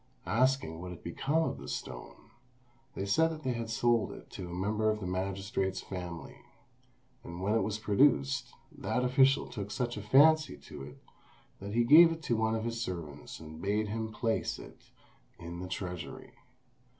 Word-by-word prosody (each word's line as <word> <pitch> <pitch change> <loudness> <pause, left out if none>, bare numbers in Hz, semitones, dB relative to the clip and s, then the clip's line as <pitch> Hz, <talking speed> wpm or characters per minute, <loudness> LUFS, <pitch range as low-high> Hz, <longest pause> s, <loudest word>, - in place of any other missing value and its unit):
Asking 125 -9 +1
what 90 - -6
had 90 - -9
become 145 - 0
of - - -4
the - - -9
stone, - - -7 0.6
they 95 - -3
said 160 +9 +2
they 130 - 0
had 115 -1 -4
sold 115 0 +2
it - - -12
to 90 - -7
a - - -7
member 105 +5 0
of 105 0 0
the 100 - -5
magistrate's 95 +1 -2
family; 90 -4 -7 0.8
and 85 0 -8
when 100 +3 0
it 115 - +3
was 105 -1 -1
produced, 105 - +2 0.2
that 125 - -1
official 135 +2 +4
took 105 -5 -6
such 120 +1 -2
a - - -4
fancy 155 +8 +5
to - - -11
it 70 +2 -9 0.6
that 100 +2 -6
he 120 - +4
gave 165 +7 +9
it 165 0 -5
to 120 - +1
one 110 0 +1
of 110 - -2
his 115 0 -2
servants 80 -9 -6
and 80 0 -10
bade 105 +2 0
him 110 +1 -3
place 115 +1 -1
it - - -13 0.5
in 85 +1 -7
the 90 - -5
treasury. 90 -1 -6
105 Hz, 175 wpm, -31 LUFS, 90-120 Hz, 0.8 s, gave